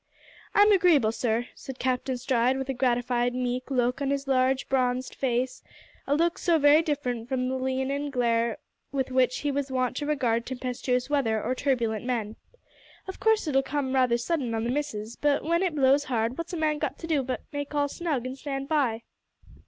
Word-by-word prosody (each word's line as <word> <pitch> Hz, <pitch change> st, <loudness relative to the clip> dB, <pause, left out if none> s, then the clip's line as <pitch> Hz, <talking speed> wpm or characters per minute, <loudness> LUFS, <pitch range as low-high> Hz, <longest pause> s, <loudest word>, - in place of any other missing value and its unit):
"I'm 410 Hz, +1 st, +6 dB
agreeable, 335 Hz, -, +4 dB
sir," 235 Hz, +1 st, -1 dB
said 265 Hz, -1 st, -9 dB
Captain 255 Hz, 0 st, -1 dB
Stride, 250 Hz, 0 st, +1 dB
with 265 Hz, 0 st, -3 dB
a -, -, +1 dB
gratified, 245 Hz, -1 st, +1 dB
meek 250 Hz, +1 st, -2 dB
look 250 Hz, 0 st, 0 dB
on 275 Hz, -, 0 dB
his 280 Hz, 0 st, -1 dB
large 260 Hz, 0 st, +2 dB
bronzed 255 Hz, -1 st, 0 dB
face 255 Hz, -1 st, -1 dB, 0.5 s
a 285 Hz, -, +2 dB
look 335 Hz, +2 st, +1 dB
so 340 Hz, -2 st, +3 dB
very 295 Hz, +1 st, +6 dB
different 250 Hz, -7 st, -3 dB
from 255 Hz, -1 st, 0 dB
the 260 Hz, -, -1 dB
leonine 265 Hz, +2 st, -1 dB
glare 235 Hz, -3 st, +1 dB, 0.3 s
with 265 Hz, -2 st, -2 dB
which 255 Hz, -1 st, +2 dB
he 290 Hz, -, 0 dB
was 280 Hz, 0 st, -2 dB
wont 255 Hz, -1 st, 0 dB
to 290 Hz, -, -3 dB
regard 240 Hz, -6 st, 0 dB
tempestuous 250 Hz, 0 st, -2 dB
weather 245 Hz, -7 st, 0 dB
or 250 Hz, -, 0 dB
turbulent 240 Hz, -5 st, 0 dB
men. 230 Hz, -4 st, -2 dB, 0.7 s
"Of 380 Hz, -, -7 dB
course 445 Hz, -5 st, +2 dB
it'll 270 Hz, -2 st, +3 dB
come 270 Hz, -1 st, -2 dB
rather 255 Hz, -3 st, +3 dB
sudden 245 Hz, -2 st, -1 dB
on 225 Hz, -, -1 dB
the 235 Hz, -, -1 dB
missus, 235 Hz, -6 st, -3 dB
but 290 Hz, -1 st, +1 dB
w'en 335 Hz, +2 st, +1 dB
it 365 Hz, -5 st, 0 dB
blows 280 Hz, 0 st, +4 dB
hard 230 Hz, -1 st, -1 dB
what's 335 Hz, +4 st, -6 dB
a -, -, -2 dB
man 305 Hz, -1 st, 0 dB
got -, -, -2 dB
to -, -, -7 dB
do 315 Hz, -4 st, +1 dB
but 255 Hz, 0 st, -3 dB
make 285 Hz, +1 st, -4 dB
all 290 Hz, 0 st, +2 dB
snug 290 Hz, -5 st, -2 dB
and 255 Hz, +1 st, -4 dB
stand 275 Hz, -1 st, -5 dB
by?" 260 Hz, -7 st, 0 dB
260 Hz, 195 wpm, -27 LUFS, 245-290 Hz, 0.7 s, I'm